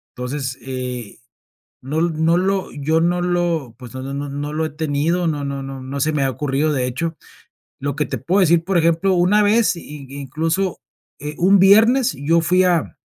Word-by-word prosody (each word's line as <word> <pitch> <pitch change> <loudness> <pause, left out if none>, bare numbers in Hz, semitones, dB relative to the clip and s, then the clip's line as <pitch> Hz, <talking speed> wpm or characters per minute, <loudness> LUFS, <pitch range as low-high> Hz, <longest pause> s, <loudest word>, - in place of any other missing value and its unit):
Entonces, 130 +1 -4
eh, 125 -3 -6 0.6
no 135 +4 -4
l 170 +1 +1
no 160 +2 +2
lo 190 +1 0
yo 155 +3 0
no 175 +1 +1
lo, 175 -8 -1
pues, 125 -3 -11
no 130 - -5
no 135 +1 -6
no 140 +1 -4
no 145 +2 -4
lo 160 +1 -1
he - - -3
tenido, 160 +3 0
no 150 -3 -2
no 140 -1 -4
no 135 -1 -7
no 135 +2 -5
se 155 +3 +1
me 145 -2 +1
ha 135 - +1
ocurrido, 145 +3 -1
de 130 -3 0
hecho. 160 +6 -3 0.6
Lo 140 0 -3
que 150 0 0
te - - -4
puedo 185 +9 +1
decir, 170 -2 +4
por 190 +1 0
ejemplo, 170 +3 +2
una 185 +4 +3
vez 215 0 +3
y 150 -4 -10
incluso, 165 +7 -2 0.4
eh, 150 +1 -6
un 190 +3 +4
viernes 225 +7 +5
yo 165 +4 +2
fui 180 +3 +3
a 175 -3 0
155 Hz, 200 wpm, -20 LUFS, 140-175 Hz, 0.6 s, viernes